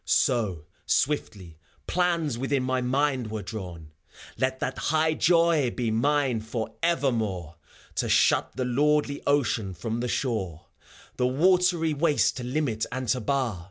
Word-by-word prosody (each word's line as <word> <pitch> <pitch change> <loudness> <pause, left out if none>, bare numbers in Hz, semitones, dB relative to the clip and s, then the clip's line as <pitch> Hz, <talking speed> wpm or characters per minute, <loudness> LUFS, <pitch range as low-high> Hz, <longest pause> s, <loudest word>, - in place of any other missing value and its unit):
So, 105 - +1 0.2
swiftly, 100 - -1 0.3
plans 170 -6 0
within 135 +2 -1
my 130 0 0
mind 130 -1 0
were 110 -1 -4
drawn: 90 -6 -8 0.4
Let 130 0 -1
that 130 - -3
high 155 +1 +2
joy 165 -5 +3
be 120 -2 -2
mine 130 +1 +1
forevermore, 110 - -2 0.4
To - - 0
shut - - +3
the 130 - -1
lordly 145 +3 +1
Ocean 115 -9 +1
from 115 +4 -3
the 125 - -2
shore, 105 - -2 0.5
The 125 - +2
watery 175 +3 +3
waste 150 0 +2
to 125 - -5
limit 125 -4 -1
and 130 -1 -4
to 125 - +2
bar. 125 -4 -1
130 Hz, 135 wpm, -26 LUFS, 110-150 Hz, 0.5 s, joy